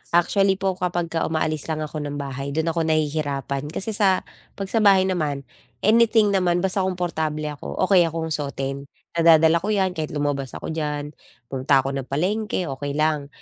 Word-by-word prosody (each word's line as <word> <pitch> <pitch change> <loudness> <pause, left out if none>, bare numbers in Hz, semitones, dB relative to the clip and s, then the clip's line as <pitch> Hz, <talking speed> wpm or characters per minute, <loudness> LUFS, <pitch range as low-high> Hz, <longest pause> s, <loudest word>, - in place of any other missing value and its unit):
Actually 195 +3 +3
po 195 0 0
kapag 175 -2 -1
ka 165 - 0
umaalis 155 -1 -1
lang 155 -1 -2
ako 155 0 -5
ng 145 -1 -4
bahay 140 0 -5
dun 160 +1 +1
ako 165 - -2
nahihirapan, 145 -3 -1
kasi 195 +7 -4
sa 200 -3 +2 0.3
pag 195 -1 -5
sa 225 - +2
bahay 195 -3 +6
naman, 155 -7 -1 0.4
anything 220 -1 +4
naman 180 -2 +1
basta 190 +1 0
komportable 170 -5 -1
ako 145 - -7
okey 185 -3 +5
akong 160 0 -4
suotin, 140 -2 -3 0.2
nadadala 165 0 +5
ko 195 - -5
yan 195 -3 +1
kahit 155 -3 -5
lumabas 145 -2 -2
ako - - -5
diyan, 150 -2 -3 0.4
punta 135 0 +2
ako 135 - -2
ng 135 -1 -4
palengke 195 - -1
okey 140 +1 -4
lang. 150 -2 +1
160 Hz, 175 wpm, -23 LUFS, 145-185 Hz, 0.4 s, bahay